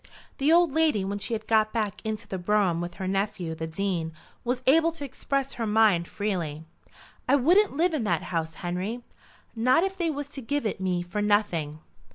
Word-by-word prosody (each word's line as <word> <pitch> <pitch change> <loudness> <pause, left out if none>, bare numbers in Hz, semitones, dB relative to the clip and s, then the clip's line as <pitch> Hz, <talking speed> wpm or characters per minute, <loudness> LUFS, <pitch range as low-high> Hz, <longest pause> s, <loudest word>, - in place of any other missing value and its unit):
The 280 +3 +3
old 340 -2 +5
lady 310 -11 +2
when 200 +1 -3
she 230 - -2
had 220 - -6
got 215 -1 +3
back 215 -4 -2
into 220 0 -4
the 190 - -4
brougham 180 -2 +1
with 175 0 -5
her 190 - -4
nephew, 190 -3 -1
the 160 0 -5
Dean, 165 -1 -2 0.3
was 250 +1 -2
able 325 +5 +5
to 290 -3 -5
express 275 +1 -2
her 230 -2 -3
mind 210 -5 +4
freely. 170 -8 -3 0.7
"I 275 - +6
wouldn't 345 +5 +3
live 340 +1 +2
in 290 -7 0
that 170 -5 0
house, 160 -1 -2
Henry, 190 +8 -3 0.5
not 255 +8 +3
if 385 0 -1
they 340 -2 +1
was 290 -1 -3
to 275 - -7
give 285 +2 -2
it 205 -2 -2
me 180 -2 0
for 195 +4 -3
nothing." 180 -8 0
215 Hz, 200 wpm, -27 LUFS, 180-275 Hz, 0.7 s, I